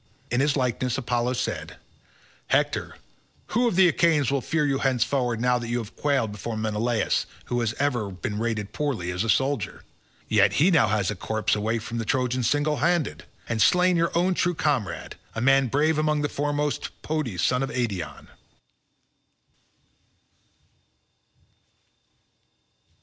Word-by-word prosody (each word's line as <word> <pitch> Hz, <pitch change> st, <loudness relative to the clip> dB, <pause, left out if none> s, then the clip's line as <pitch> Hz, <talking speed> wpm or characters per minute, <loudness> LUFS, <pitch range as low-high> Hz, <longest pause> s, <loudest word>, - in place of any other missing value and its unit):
In 120 Hz, -, +1 dB
his 145 Hz, +1 st, +2 dB
likeness 125 Hz, -1 st, 0 dB
Apollo 125 Hz, -1 st, 0 dB
said, 130 Hz, 0 st, -3 dB, 0.7 s
"Hector, -, -, 0 dB, 0.5 s
who 240 Hz, +3 st, +2 dB
of 230 Hz, -, 0 dB
the 190 Hz, 0 st, +6 dB
Achaeans 160 Hz, -6 st, +2 dB
will 140 Hz, -1 st, +1 dB
fear 155 Hz, +3 st, 0 dB
you 135 Hz, -2 st, 0 dB
henceforward 125 Hz, -2 st, +1 dB
now 125 Hz, +1 st, +2 dB
that 120 Hz, -, -6 dB
you 120 Hz, +1 st, -1 dB
have 115 Hz, -3 st, -6 dB
quailed 140 Hz, -7 st, 0 dB
before 110 Hz, +2 st, -5 dB
Menelaus 110 Hz, +1 st, 0 dB, 0.2 s
who 120 Hz, -, -1 dB
has 115 Hz, -1 st, -1 dB
ever 125 Hz, -7 st, 0 dB
been 100 Hz, +3 st, -4 dB
rated 110 Hz, -3 st, -2 dB
poorly 125 Hz, -, -2 dB
as 90 Hz, +3 st, -1 dB
a 115 Hz, -, -3 dB
soldier? 135 Hz, -3 st, 0 dB, 0.4 s
Yet 100 Hz, -2 st, +4 dB
he 145 Hz, -, +3 dB
has 190 Hz, -, +4 dB
now 115 Hz, -9 st, +5 dB
got 105 Hz, -1 st, 0 dB
a -, -, -4 dB
corpse 110 Hz, +3 st, -1 dB
away 110 Hz, +2 st, 0 dB
from 115 Hz, +1 st, -5 dB
the 115 Hz, -, -3 dB
Trojans 125 Hz, +1 st, 0 dB
single 145 Hz, +1 st, +1 dB
handed, 170 Hz, -1 st, 0 dB, 0.2 s
and 115 Hz, -1 st, -1 dB
has -, -, +7 dB
slain 180 Hz, 0 st, +3 dB
your 170 Hz, 0 st, +2 dB
own 180 Hz, +2 st, +2 dB
true 175 Hz, 0 st, 0 dB
comrade, 140 Hz, -10 st, -2 dB, 0.2 s
a -, -, -2 dB
man 135 Hz, +2 st, +4 dB
brave 150 Hz, +5 st, +2 dB
among 150 Hz, -1 st, +1 dB
the 145 Hz, -, 0 dB
foremost, 145 Hz, 0 st, -1 dB
Podes 140 Hz, -, -2 dB
son 125 Hz, 0 st, +2 dB
of 135 Hz, -, -1 dB
Eetion." 105 Hz, -, -3 dB
125 Hz, 155 wpm, -25 LUFS, 110-145 Hz, 0.7 s, has